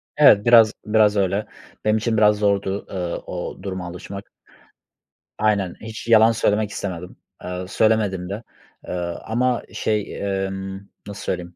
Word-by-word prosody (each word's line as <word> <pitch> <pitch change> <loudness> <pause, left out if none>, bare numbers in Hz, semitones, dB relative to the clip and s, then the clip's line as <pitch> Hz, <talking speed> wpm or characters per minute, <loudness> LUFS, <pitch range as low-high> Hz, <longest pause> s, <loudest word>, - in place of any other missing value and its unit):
Evet, 120 -8 +6
biraz 115 -3 +7
biraz 105 -1 +4
öyle. 100 +1 +1 0.4
Benim 110 0 +3
için 110 0 0
biraz 105 -1 +5
zordu, 100 -1 0
eee, 90 -3 -3
o - - -5
duruma 95 -2 -4
alışmak. 100 +3 -8 1.1
Aynen, 100 -4 +1
hiç 110 +1 -8
yalan 115 0 +6
söylemek 105 -2 +1
istemedim. 90 -3 -5 0.3
Eee, 90 0 -4
söylemedim 95 -3 +1
de. 105 +4 -5 0.4
Eee, - - -4 0.3
ama, 120 +2 +1
şey, 105 -2 -2 0.3
emm, 95 0 -5 0.3
nasıl 100 -1 -7
söyleyeyim? 85 0 -4
105 Hz, 135 wpm, -22 LUFS, 95-110 Hz, 1.1 s, biraz